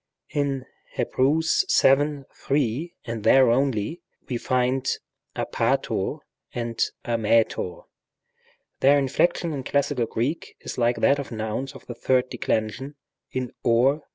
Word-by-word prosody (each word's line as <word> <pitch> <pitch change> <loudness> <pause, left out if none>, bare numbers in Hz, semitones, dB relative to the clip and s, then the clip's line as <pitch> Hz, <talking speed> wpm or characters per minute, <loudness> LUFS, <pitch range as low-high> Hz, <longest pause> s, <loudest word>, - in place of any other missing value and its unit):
In 140 -3 -1 0.3
Heb, - - -2
vii. 145 0 +3
3, 140 +4 -1
and 115 -3 -4
there 130 -1 +6
only, 135 - 0 0.3
we 125 - -2
find 130 +1 +1 0.5
ἀπάτωρ - - -1 0.3
and 115 -2 -3 0.2
ἀμήτωρ. 115 -5 +1 1.0
Their 140 +2 +5
inflection 160 +5 +1
in 135 -2 -4
classical 140 -3 0
Greek 125 +9 -3
is - - -6
like 120 0 +3
that 140 +1 +4
of 140 - -6
nouns 110 +4 -3
of - - -13
the 120 - -6
third 130 +1 +1
de - - -6
clension 110 +6 -1 0.4
in 125 -2 -3
wp 125 +6 +4
G. - - -25
130 Hz, 125 wpm, -25 LUFS, 115-140 Hz, 1.0 s, there